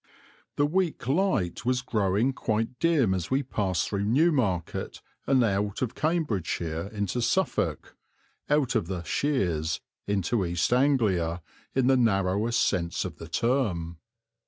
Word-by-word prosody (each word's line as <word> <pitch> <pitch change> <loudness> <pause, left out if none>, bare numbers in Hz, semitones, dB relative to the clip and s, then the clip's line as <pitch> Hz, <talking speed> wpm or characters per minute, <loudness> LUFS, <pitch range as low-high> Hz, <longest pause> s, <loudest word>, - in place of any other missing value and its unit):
The 145 - +3
weak 170 -4 -1
light 135 - +1
was 125 +1 0
growing 110 +1 +1
quite 115 +1 -2
dim 150 - +3
as 90 -1 -3
we 135 +2 +1
passed 95 -8 -1
through 100 -1 -2
Newmarket 120 - +1 0.3
and 130 -2 +4
out 100 +1 0
of 120 - -2
Cambridgeshire 100 - -1
into 105 +2 -2
Suffolk - - 0 0.5
out 145 -4 +2
of 110 -8 0
"the 90 -2 -4
Sheers" 85 - 0 0.3
into 100 +2 0
East 85 +5 0
Anglia, 100 - +2 0.3
in 130 -1 +3
the 130 0 +4
narrowest 105 0 +2
sense 85 -3 -1
of - - -6
the 80 - -9
term. 85 - -1
110 Hz, 135 wpm, -27 LUFS, 90-130 Hz, 0.5 s, and